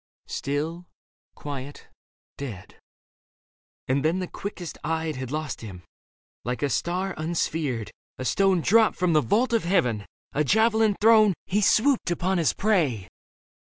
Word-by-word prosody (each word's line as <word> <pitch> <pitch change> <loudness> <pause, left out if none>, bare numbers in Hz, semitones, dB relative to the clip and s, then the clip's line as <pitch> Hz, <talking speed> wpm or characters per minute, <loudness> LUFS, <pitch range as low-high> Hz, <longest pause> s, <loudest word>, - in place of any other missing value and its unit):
Still, 160 +5 -3 0.5
quiet, 140 -1 -7 0.5
dead... 110 -9 -8 1.1
and 135 +2 +1
then 160 +4 +2
the 185 - -2
quickest 180 -5 -7
eyed 160 0 -1
Had 130 -1 -5
lost 150 -1 -4
him. 95 -5 -9 0.6
Like 125 +3 -3
a 140 - +1
star 175 - -1
unsphered, 155 -7 -2 0.3
a 130 - -5
stone 190 - +2
Dropped 220 +6 +4
from 180 -2 +1
the 155 - +5
vault 235 - +1
of 230 - +2
heaven, 125 - +1 0.3
a 150 - +2
javelin 220 - +3
thrown, 215 -3 +6
He 205 +3 0
swooped 235 +5 +3
upon 180 +1 0
his 165 - +2
prey. 150 - 0
165 Hz, 135 wpm, -25 LUFS, 140-195 Hz, 1.1 s, thrown